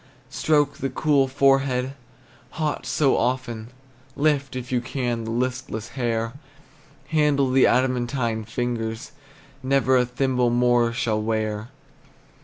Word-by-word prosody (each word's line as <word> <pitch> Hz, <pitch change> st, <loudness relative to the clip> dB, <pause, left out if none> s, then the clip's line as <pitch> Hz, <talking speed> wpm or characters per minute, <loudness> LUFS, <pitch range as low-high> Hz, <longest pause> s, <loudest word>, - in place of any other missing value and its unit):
Stroke 145 Hz, -2 st, +1 dB
the 135 Hz, -, -2 dB
cool 140 Hz, 0 st, +2 dB
forehead, 135 Hz, -1 st, +2 dB, 0.6 s
hot 155 Hz, -2 st, -2 dB
so 140 Hz, -3 st, +2 dB
often, 120 Hz, -2 st, -2 dB, 0.5 s
Lift, 140 Hz, -2 st, +1 dB
if 125 Hz, 0 st, -6 dB
you 125 Hz, -1 st, +1 dB
can, 120 Hz, -3 st, -3 dB
the -, -, -5 dB
listless 120 Hz, -2 st, -3 dB
hair; 115 Hz, -2 st, -2 dB, 0.8 s
Handle 150 Hz, -4 st, +2 dB
the 130 Hz, 0 st, +5 dB
adamantine 125 Hz, -2 st, 0 dB
fingers 115 Hz, 0 st, -3 dB, 0.5 s
Never 130 Hz, -1 st, +3 dB
a 125 Hz, -, +3 dB
thimble 125 Hz, -1 st, +1 dB
more 120 Hz, -1 st, +3 dB
shall 110 Hz, -2 st, -1 dB
wear. 110 Hz, 0 st, -2 dB
125 Hz, 115 wpm, -24 LUFS, 115-135 Hz, 0.8 s, the